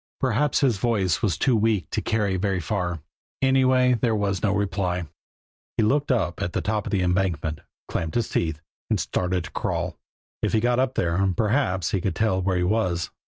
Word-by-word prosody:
Perhaps 130 +3 +1
his 125 -7 +3
voice 95 -6 +1
was 95 -9 +1
too 130 - +2
weak 105 -7 +1
to - - -1
carry 105 -4 0
very 95 0 0
far; 90 -2 -2 0.4
anyway, 130 -1 +4
there 115 -1 +1
was 100 -3 -1
no 100 - +2
reply. 95 -4 -1 0.7
He 115 - +3
looked 140 +6 +2
up 95 -9 0
at 85 - -2
the - - 0
top 105 -1 -1
of - - -4
the 95 -3 +1
embankment, 90 -4 0 0.3
clamped 80 -1 -3
his 120 - +1
teeth, 80 -2 -1 0.3
and - - +1
started 90 -1 -1
to - - -9
crawl. - - -3 0.4
If - - 0
he 110 - +4
got 120 +2 +2
up 130 0 +1
there, 95 +3 +1
perhaps 105 - +1
he 95 - 0
could 95 - -1
tell 110 -4 +1
where 95 0 +1
he 90 - +1
was. 90 -4 0
100 Hz, 195 wpm, -24 LUFS, 90-115 Hz, 0.7 s, anyway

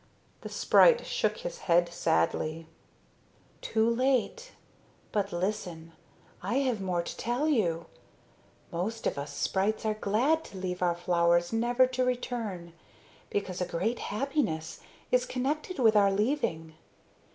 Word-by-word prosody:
The, - - -7
sprite 485 -1 +5
shook - - 0
his - - -6
head 175 +1 +5
sadly. 155 - 0 1.0
"Too 220 0 +1
late. 260 - 0 0.6
But 205 -1 -1
listen. 175 -3 -3 0.5
I 200 +7 -2
have 255 -6 +1
more 180 -2 -1
to - - -7
tell 245 +6 -1
you. 175 - +1 0.9
Most 215 +7 -3
of - - 0
us 140 +1 -5
sprites 205 +4 -1
are 215 - +2
glad 240 +10 +1
to 195 - -10
leave 185 -1 -4
our 175 -1 +2
flowers 175 +1 +2
never 240 +3 +3
to 255 0 -1
return, 230 -9 -3 0.6
because 185 -3 -3
a - - +1
great 195 +8 -1
happiness 210 - -2 0.3
is 250 0 +3
connected 295 +8 -2
with 225 -4 +4
our 200 -1 +5
leaving. 195 - -1
210 Hz, 130 wpm, -29 LUFS, 175-250 Hz, 1.0 s, sprite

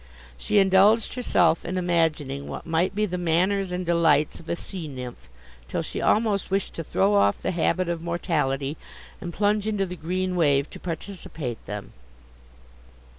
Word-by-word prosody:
She 205 - 0
indulged 200 +3 +5
herself 175 -10 +2
in 185 - -3
imagining 160 -6 0
what - - -6
might 165 +3 0
be 210 +1 +2
the 180 -3 -3
manners 180 +3 +1
and 180 0 -3
delights 160 -3 +3
of 165 - -13
a - - 0
sea 175 -2 -7
nymph, 125 - -8 0.4
till - - -2
she - - -4
almost 210 -2 +2
wished 195 0 -1
to 165 - -5
throw 195 +6 +2
off 100 - +3
the - - 0
habit 180 +1 +1
of 170 -1 -2
mortality, 150 -5 -1 0.4
and 175 -3 -5
plunge 205 +3 +1
into 205 -3 0
the 180 -1 -6
green 180 +2 -2
wave 145 -4 +3
to - - -9
participate 160 - -6
them. 105 -1 -6
175 Hz, 165 wpm, -25 LUFS, 155-195 Hz, 0.4 s, indulged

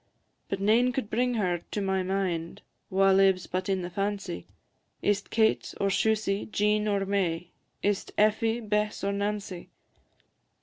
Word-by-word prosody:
But 195 - -2
nane 225 +5 +4
could 255 -5 -3
bring 245 +2 +1
her 180 -5 0
to - - -3
my 190 -1 0
mind 185 -3 -2 0.3
Wha 195 +1 +4
lives 190 -1 +4
but 185 +1 -3
in 190 -2 0
the 175 - -4
fancy, 195 - -3 0.6
Is 205 -1 +2
't - - -25
Kate, 220 -1 +1
or 200 - +2
Shusie, 210 0 +1
Jean, 210 0 +1
or 200 -1 +1
May, 180 -4 -1 0.3
Is 205 -1 +1
't - - -14
Effie, 225 +2 +2
Bess, 210 -1 -1
or 200 - +1
Nancy? 200 -3 -3
200 Hz, 160 wpm, -28 LUFS, 190-210 Hz, 0.6 s, nane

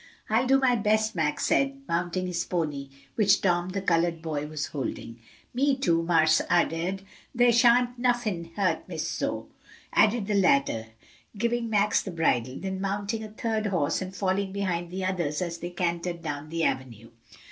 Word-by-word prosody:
"I'll 235 +4 +3
do 270 +1 +5
my 255 -2 +3
best," 215 0 +1
Max 150 -3 0
said, 275 0 +1
mounting 175 +2 -1
his 175 -1 -2
pony, 150 -6 -3 0.2
which 200 -3 +4
Tom 175 -1 +1
the 190 +1 -3
colored 170 -2 +1
boy 150 -2 -3
was 150 -1 -3
holding. 120 -4 -5 0.3
"Me, 270 +2 +2
too, 170 -10 +2
Marse 160 -2 +3
Ed'ard, 175 +2 +1 0.3
dere 240 0 +5
shan't 245 +1 +4
nuffin 235 -9 0
hurt 185 -5 0
Miss - - -3
Zoe," - - -3 0.5
added 220 0 +3
the 210 - -1
latter, 140 - +2 0.5
giving 235 +1 0
Max 210 -1 +2
the - - -7
bridle, 130 -8 0
then 190 0 -4
mounting 205 +3 -2
a 215 - -7
third 220 0 -2
horse 175 -6 0
and 185 0 -6
falling 190 0 0
behind 180 -3 -2
the 185 +1 -4
others 170 -6 -1
as 170 -2 -3
they 175 - -5
cantered 170 -1 -2
down 145 +1 -5
the 165 0 -2
avenue. 115 -5 -3
185 Hz, 170 wpm, -27 LUFS, 165-215 Hz, 0.5 s, do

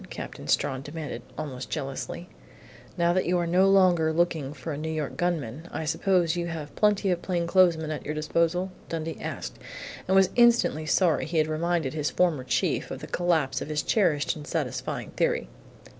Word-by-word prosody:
Captain - - -7
Strawn 130 0 +1
demanded, 145 -4 -6 0.2
almost 135 -4 -5
jealously. 145 +4 -4 0.7
"Now 170 0 +3
that 185 -1 +1
you 180 +1 +2
are 175 - 0
no 185 +3 +4
longer 180 -5 +4
looking 160 -4 0
for 155 +1 -6
a - - -4
New 160 +1 -3
York 155 -2 -3
gunman, 160 -4 -2
I 160 - -3
suppose 170 +1 +2
you 170 -1 -2
have 160 -3 -6
plenty 205 -2 +2
of 175 -1 -1
plainclothesmen 170 -3 +2
at 155 - -4
your 150 - -4
disposal?" 170 +4 0 0.2
Dundee 165 -1 -4
asked, - - -5 0.5
and 190 - +2
was 190 -1 +5
instantly 235 -10 +4
sorry 165 +1 +2
he 165 +1 -2
had 155 - +4
reminded 160 -2 0
his 150 -2 -1
former 170 -7 +1
chief - - 0
of - - -6
the - - -5
collapse 170 -6 0
of - - -4
his 150 -1 -1
cherished 175 -8 +2
and 150 -1 -9
satisfying 150 -8 -3
theory. - - 0
165 Hz, 180 wpm, -27 LUFS, 150-175 Hz, 0.7 s, was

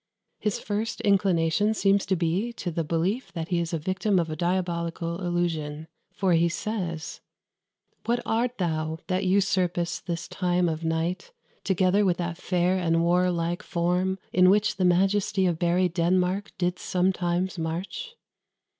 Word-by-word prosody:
His 210 -2 -1
first 215 +2 -3
inclination 195 +1 +2
seems 200 -1 +2
to 190 - +2
be 180 +7 0
to 180 -6 -4
the 165 0 -1
belief 170 - -1
that 165 -2 -4
he 175 -2 +1
is 170 -1 -2
the 165 - -1
victim 185 +5 0
of 165 -2 0
a - - -3
diabolical 170 0 -2
illusion; 160 -4 -2 0.2
for 190 -3 +1
he 170 +1 +3
says 175 -4 -4 0.9
"What 240 +1 +2
art 235 +2 0
thou, 160 -3 -1
that 185 +1 -1
usurp'st 185 -2 +1
this 170 -1 -3
time 180 -1 0
of 160 0 -3
night, 165 - -2 0.3
Together 190 +1 +2
with 180 -3 +2
that 170 -1 -3
fair 180 0 +1
and 165 -1 +2
warlike 175 -1 +1
form 180 +2 0 0.2
In 185 0 +6
which 210 +1 +2
the 185 - +1
majesty 190 +2 +2
of 170 -3 0
buried 175 0 +2
Denmark 180 +3 +1
Did 180 -1 -1
sometimes 180 0 0
march?" 190 - -4
180 Hz, 150 wpm, -26 LUFS, 170-190 Hz, 0.9 s, In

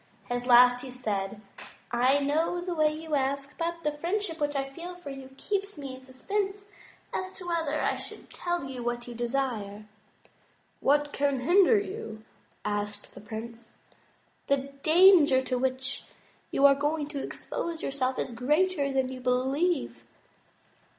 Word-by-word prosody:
At 245 0 -2
last 245 0 +7
he 265 - -7
said: 210 -5 -3 0.5
"I 250 +3 +4
know 305 +5 +1
the 355 0 -3
way 310 -2 +3
you 315 0 -6
ask, 275 0 0
but 335 0 -2
the 300 - +1
friendship 340 +3 -2
which 290 0 0
I 270 0 0
feel 340 +6 -8
for 355 -6 -8
you 270 -1 -9
keeps 400 +1 -2
me 275 -2 -6
in 260 - -10
suspense 390 +10 -3 0.5
as 370 0 -3
to 360 -2 -8
whether 325 -3 0
I - - +1
should - - -7
tell 350 -2 -2
you 265 -2 -6
what 240 0 -2
you 240 - -6
desire." 235 -4 -2 0.9
"What 290 +1 +2
can 280 -2 +1
hinder 380 - +5
you?" 385 - -5 0.4
asked 205 0 -3
the - - -11
prince. 225 +2 -8 0.7
"The 275 0 0
danger 320 -4 +7
to 255 -1 -1
which 260 0 -2 0.4
you 275 - +3
are 280 - +9
going 295 +2 -1
to 285 -2 -4
expose 335 +3 -4
yourself 265 -1 -1
is 260 - -2
greater 290 +5 +1
than 265 -1 +1
you 260 -1 -7
believe. 255 - 0
275 Hz, 155 wpm, -28 LUFS, 250-330 Hz, 0.9 s, are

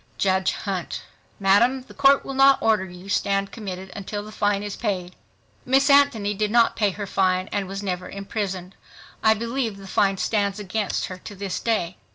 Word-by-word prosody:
JUDGE 190 -1 +2
HUNT—Madam, 200 +5 0
the - - -15
Court 275 0 +4
will 275 - -5
not 270 0 +6
order 215 -4 +2
you 180 +1 -12
stand 200 0 0
committed 190 -3 -7
until 205 +1 -5
the 215 - -10
fine 205 -1 0
is 205 -1 -5
paid. 185 -5 -3 0.5
Miss 270 +3 +3
Anthony 275 -8 +4
did 210 +1 -1
not 235 +1 +4
pay 210 -2 +2
her 205 +2 -5
fine 185 -1 +1
and 200 -2 -2
was 195 +1 -5
never 180 -2 -3
imprisoned. 195 -2 -4 0.5
I 220 0 +5
believe 230 -1 -2
the 195 - -11
fine 195 0 +1
stands 200 -1 0
against 210 0 -2
her 185 0 -8
to 205 - -10
this 195 -1 -4
day. 210 -6 -1
200 Hz, 180 wpm, -24 LUFS, 190-220 Hz, 0.5 s, not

